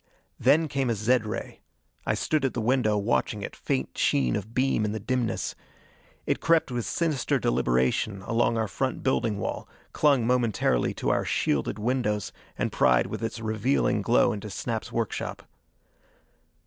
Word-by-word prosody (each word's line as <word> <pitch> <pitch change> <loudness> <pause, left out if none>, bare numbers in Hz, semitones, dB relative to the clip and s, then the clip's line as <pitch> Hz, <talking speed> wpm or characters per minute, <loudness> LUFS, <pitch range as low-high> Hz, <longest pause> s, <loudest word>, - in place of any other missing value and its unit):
Then 160 +2 +4
came 135 -3 -1
a 115 - +1
zed 110 +2 +1
ray. 105 - -5 0.5
I - - +2
stood 155 -2 0
at 135 - 0
the - - -1
window, 110 -2 +2
watching 105 0 0
it, - - -6
faint 65 0 -2
sheen 65 -3 +2
of 105 +2 -4
beam 130 -4 +2
in 105 0 -1
the 110 - -3
dimness. 125 +2 -1 0.7
It - - 0
crept 165 -5 +2
with 120 -2 -2
sinister 155 -7 0
deliberation 65 - +1
along 115 +2 +1
our 110 -1 0
front 130 +5 -2
building 115 -5 +1
wall, 100 - -4 0.2
clung 140 -6 +3
momentarily 115 - +1
to - - -1
our - - +1
shielded 70 +7 0
windows 105 -2 -1 0.3
and - - -1
pried 60 0 +3
with - - -5
its 115 0 -3
revealing 110 +1 +1
glow 120 +2 +3
into 105 0 -6
Snap's 110 +2 -4
workshop. 115 -3 -3
115 Hz, 160 wpm, -27 LUFS, 105-130 Hz, 0.7 s, Then